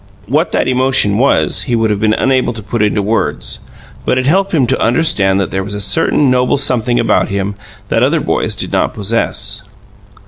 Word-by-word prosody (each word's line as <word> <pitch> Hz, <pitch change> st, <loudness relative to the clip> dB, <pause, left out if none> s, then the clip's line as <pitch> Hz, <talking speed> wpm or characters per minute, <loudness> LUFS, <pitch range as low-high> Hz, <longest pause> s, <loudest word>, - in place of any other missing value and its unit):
What 150 Hz, -, 0 dB
that -, -, +1 dB
emotion 130 Hz, -5 st, +2 dB
was, 140 Hz, +2 st, +1 dB
he 120 Hz, -, +2 dB
would 115 Hz, -1 st, +1 dB
have 105 Hz, -, -1 dB
been 110 Hz, 0 st, +2 dB
unable 130 Hz, -2 st, +1 dB
to 110 Hz, -1 st, -8 dB
put 110 Hz, +2 st, -3 dB
into 105 Hz, -1 st, +1 dB
words; 100 Hz, -8 st, -1 dB, 0.4 s
but 125 Hz, -, 0 dB
it 130 Hz, -, 0 dB
helped 190 Hz, +7 st, +2 dB
him 145 Hz, -7 st, +2 dB
to 130 Hz, +2 st, -1 dB
understand 110 Hz, -7 st, +2 dB
that 95 Hz, -, -2 dB
there 95 Hz, 0 st, -2 dB
was 100 Hz, +1 st, -5 dB
a -, -, -4 dB
certain 135 Hz, +5 st, +2 dB
noble 125 Hz, +2 st, +2 dB
something 125 Hz, -3 st, +1 dB
about 115 Hz, -, +1 dB
him 100 Hz, 0 st, -2 dB, 0.4 s
that -, -, +1 dB
other -, -, +2 dB
boys -, -, -1 dB
did -, -, -2 dB
not -, -, 0 dB
possess. 105 Hz, -1 st, -1 dB
115 Hz, 200 wpm, -14 LUFS, 100-130 Hz, 0.4 s, emotion